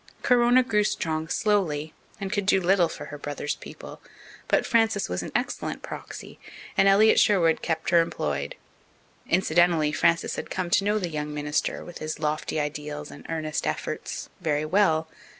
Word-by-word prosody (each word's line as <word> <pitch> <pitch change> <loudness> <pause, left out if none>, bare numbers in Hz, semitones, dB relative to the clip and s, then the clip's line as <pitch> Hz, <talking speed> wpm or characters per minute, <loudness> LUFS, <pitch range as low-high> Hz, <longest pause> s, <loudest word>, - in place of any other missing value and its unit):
Corona 245 0 +5
grew 210 -4 +2
strong 160 -5 -2
slowly, 160 -8 0 0.3
and 195 0 -4
could 205 -2 -1
do 195 - +5
little 180 -2 +3
for - - -7
her 150 - -7
brother's 145 0 -3
people, - - -11 0.5
but - - +2
Frances 225 -4 +2
was 90 - -3
an - - -7
excellent - - -2
proxy, - - -8 0.4
and 195 - +4
Elliott 210 +3 +6
Sherwood 170 -6 +3
kept 160 0 -2
her 170 -1 +6
employed. 70 - -3 0.7
Incidentally, 170 -3 +3
Frances 170 +2 +1
had - - -5
come 185 -2 -3
to 195 - +4
know 210 +1 +1
the 180 -5 -2
young 150 -1 -4
minister, 150 0 -2
with 175 - -9
his 155 0 -4
lofty 155 0 -1
ideals 150 0 -4
and 145 - -12
earnest 155 -2 -2
efforts, - - -4
very 155 -3 0
well. 160 -3 +2
165 Hz, 165 wpm, -26 LUFS, 150-195 Hz, 0.7 s, Elliott